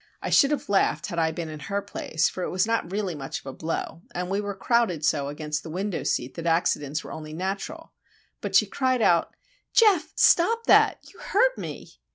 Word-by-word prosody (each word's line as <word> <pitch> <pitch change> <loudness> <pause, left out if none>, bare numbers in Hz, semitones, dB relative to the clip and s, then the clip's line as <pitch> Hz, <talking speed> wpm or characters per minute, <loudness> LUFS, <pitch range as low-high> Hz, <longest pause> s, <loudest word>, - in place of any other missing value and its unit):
I - - -4
should 275 - +6
have 295 - -2
laughed 200 -1 +1
had 170 -4 -3
I 160 -1 +2
been 165 0 -5
in 155 -1 -7
her 200 0 0
place, 170 -4 -1
for 185 - -5
it - - -2
was 185 +2 +1
not 225 -6 -1
really 195 -2 -2
much 135 -3 -5
of - - -23
a 135 - -6
blow, 165 +1 -4
and 180 +1 -3
we 200 +1 0
were 205 -1 -4
crowded 205 - +1
so 140 -1 +1
against 150 +1 -4
the 160 - -9
window 190 +3 -3
seat 125 +2 -1
that 170 0 -5
accidents 155 -3 0
were - - -9
only 155 -1 -8
natural. 195 - -5 0.5
But - - -3
she - - +6
cried 255 -3 0
out,— 170 -4 +2 0.4
"Geof! 415 -8 +4
stop 455 +7 +4
that! - - +5
You - - -18
hurt - - +2
me!" - - -7
180 Hz, 210 wpm, -25 LUFS, 160-230 Hz, 0.5 s, should